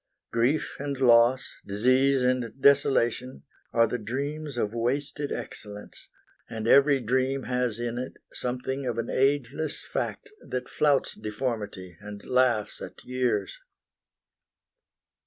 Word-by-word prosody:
Grief 120 Hz, +7 st, +1 dB
and 140 Hz, -1 st, -3 dB
loss, 120 Hz, 0 st, +4 dB
Disease 130 Hz, +6 st, +3 dB
and 125 Hz, -1 st, 0 dB
desolation, 130 Hz, -2 st, +3 dB, 0.3 s
are 115 Hz, 0 st, +4 dB
the 125 Hz, +2 st, -3 dB
dreams 140 Hz, +5 st, -4 dB
Of 105 Hz, -2 st, -1 dB
wasted 140 Hz, +5 st, -2 dB
excellence; 105 Hz, -1 st, -8 dB, 0.4 s
and 110 Hz, 0 st, -4 dB
every 140 Hz, +2 st, +6 dB
dream 130 Hz, +3 st, 0 dB
Has 125 Hz, -3 st, -1 dB
in 120 Hz, 0 st, -3 dB
it 130 Hz, -, -5 dB, 0.2 s
something 130 Hz, +2 st, -3 dB
of 120 Hz, -2 st, -2 dB
an 115 Hz, -, -2 dB
ageless 140 Hz, +2 st, 0 dB
fact -, -, -4 dB
That 125 Hz, -1 st, -4 dB
flouts 145 Hz, -3 st, +2 dB
deformity 105 Hz, -6 st, -4 dB
and 105 Hz, -1 st, -9 dB
laughs 125 Hz, -4 st, +2 dB
at -, -, -9 dB
years. 125 Hz, -6 st, -1 dB
125 Hz, 120 wpm, -27 LUFS, 115-135 Hz, 0.4 s, every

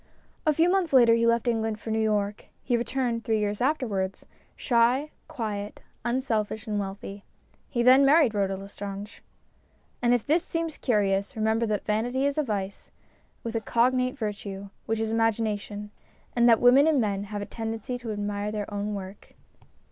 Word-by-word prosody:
A 305 Hz, -, +5 dB
few 330 Hz, +3 st, +4 dB
months 360 Hz, -4 st, +1 dB
later 240 Hz, -3 st, +7 dB
he 230 Hz, 0 st, +3 dB
left 235 Hz, +1 st, +2 dB
England 225 Hz, -2 st, 0 dB
for 225 Hz, -, -6 dB
New 220 Hz, -, +1 dB
York. 210 Hz, -1 st, 0 dB, 0.2 s
He 245 Hz, -, +1 dB
returned, 235 Hz, 0 st, -1 dB
three 220 Hz, -1 st, +1 dB
years 210 Hz, 0 st, -1 dB
afterwards, 230 Hz, -9 st, -1 dB, 0.3 s
shy, 250 Hz, +4 st, +2 dB, 0.2 s
quiet, 210 Hz, -6 st, -5 dB, 0.2 s
unselfish, 230 Hz, -3 st, -1 dB
and 210 Hz, -2 st, -1 dB
wealthy. 200 Hz, 0 st, -6 dB, 0.5 s
He 240 Hz, -2 st, 0 dB
then 260 Hz, +3 st, +7 dB
married 280 Hz, -4 st, +5 dB
Rhoda 195 Hz, -2 st, 0 dB
Lestrange. 200 Hz, +1 st, -8 dB, 0.8 s
And 240 Hz, -, +3 dB
if 245 Hz, -3 st, +2 dB
this 325 Hz, +4 st, +2 dB
seems 330 Hz, -3 st, -3 dB
curious, 200 Hz, -4 st, +1 dB
remember 220 Hz, +1 st, +1 dB
that 210 Hz, -1 st, -2 dB
vanity 245 Hz, +6 st, 0 dB
is 285 Hz, +1 st, 0 dB
a -, -, +2 dB
vice 200 Hz, -5 st, -4 dB, 0.5 s
with 230 Hz, -, -4 dB
a 225 Hz, -, -1 dB
cognate 255 Hz, +3 st, +1 dB
virtue, 200 Hz, -3 st, -5 dB, 0.2 s
which 225 Hz, 0 st, 0 dB
is 220 Hz, 0 st, -1 dB
imagination; 215 Hz, -2 st, -1 dB, 0.4 s
and 240 Hz, 0 st, +5 dB
that 230 Hz, -, +6 dB
women, 260 Hz, +5 st, +6 dB
and 310 Hz, -4 st, +3 dB
men, 200 Hz, -3 st, -1 dB
have 205 Hz, 0 st, -5 dB
a -, -, -5 dB
tendency 225 Hz, +3 st, -5 dB
to 235 Hz, -2 st, -5 dB
admire 205 Hz, 0 st, -3 dB
their 210 Hz, -1 st, -4 dB
own 205 Hz, +1 st, -2 dB
work. 195 Hz, 0 st, -9 dB
225 Hz, 170 wpm, -27 LUFS, 205-245 Hz, 0.8 s, later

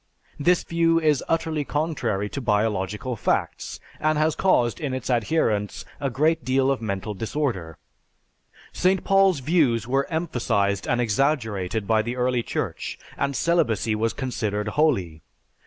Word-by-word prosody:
This 175 Hz, +4 st, +3 dB
view 165 Hz, 0 st, +2 dB
is 150 Hz, -4 st, +2 dB
utterly 160 Hz, -2 st, 0 dB
contrary 135 Hz, -10 st, -1 dB
to 140 Hz, -, -5 dB
biological 105 Hz, +1 st, 0 dB
facts, -, -, -2 dB, 0.2 s
and 155 Hz, 0 st, +1 dB
has 155 Hz, +1 st, +2 dB
caused 120 Hz, -11 st, +2 dB
in 140 Hz, -4 st, -2 dB
its 130 Hz, 0 st, -3 dB
adherents 110 Hz, -4 st, 0 dB
a 140 Hz, -, -1 dB
great 155 Hz, +4 st, +1 dB
deal 130 Hz, +2 st, +2 dB
of 135 Hz, -, -1 dB
mental 105 Hz, -1 st, -3 dB
disorder. 105 Hz, -, -3 dB, 1.0 s
St. 185 Hz, +1 st, +2 dB
Paul's 195 Hz, -6 st, +4 dB
views 130 Hz, -, +2 dB
were 135 Hz, +2 st, +1 dB
emphasized 115 Hz, -, 0 dB
and 120 Hz, -, +1 dB
exaggerated 110 Hz, -5 st, 0 dB
by 110 Hz, +2 st, +3 dB
the 120 Hz, +3 st, -4 dB
early 125 Hz, -1 st, +1 dB
Church -, -, -4 dB, 0.2 s
and 140 Hz, 0 st, -1 dB
celibacy 115 Hz, -, +1 dB
was 110 Hz, +1 st, 0 dB
considered 105 Hz, -5 st, -2 dB
holy. 100 Hz, -, +1 dB
125 Hz, 140 wpm, -24 LUFS, 110-155 Hz, 1.0 s, Paul's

